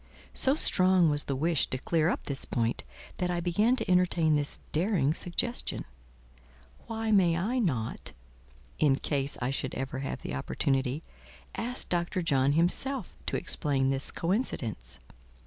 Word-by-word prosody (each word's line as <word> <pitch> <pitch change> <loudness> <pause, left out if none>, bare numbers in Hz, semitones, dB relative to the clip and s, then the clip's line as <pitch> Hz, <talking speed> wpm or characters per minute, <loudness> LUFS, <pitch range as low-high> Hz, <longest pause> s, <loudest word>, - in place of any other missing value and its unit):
So 270 +2 +4
strong 185 - +5
was 145 0 +1
the 140 - -1
wish 160 +2 +1
to 130 - -3
clear 160 +4 +1
up - - -2
this 140 -1 -2
point 115 -1 -1 0.3
that 180 - -1
I 175 -1 0
began 205 +8 +2
to - - -2
entertain 180 -3 +3
this 145 -1 0
daring 160 -4 +2
suggestion: 180 +9 -2 1.0
"Why 225 -1 -2
may 180 -5 +4
I 225 +9 0
not, 130 - -2 0.7
in 145 -3 +4
case 140 0 -2
I 125 - 0
should 135 - -3
ever 135 0 -3
have 135 - -4
the 65 - -4
opportunity, 135 - -1 0.5
ask 245 +2 -3
Dr. 175 +1 -1
John 140 -3 +3
himself 185 - 0
to - - 0
explain 135 -2 0
this 135 0 -1
coincidence?" 120 - -2
165 Hz, 145 wpm, -29 LUFS, 135-185 Hz, 1.0 s, strong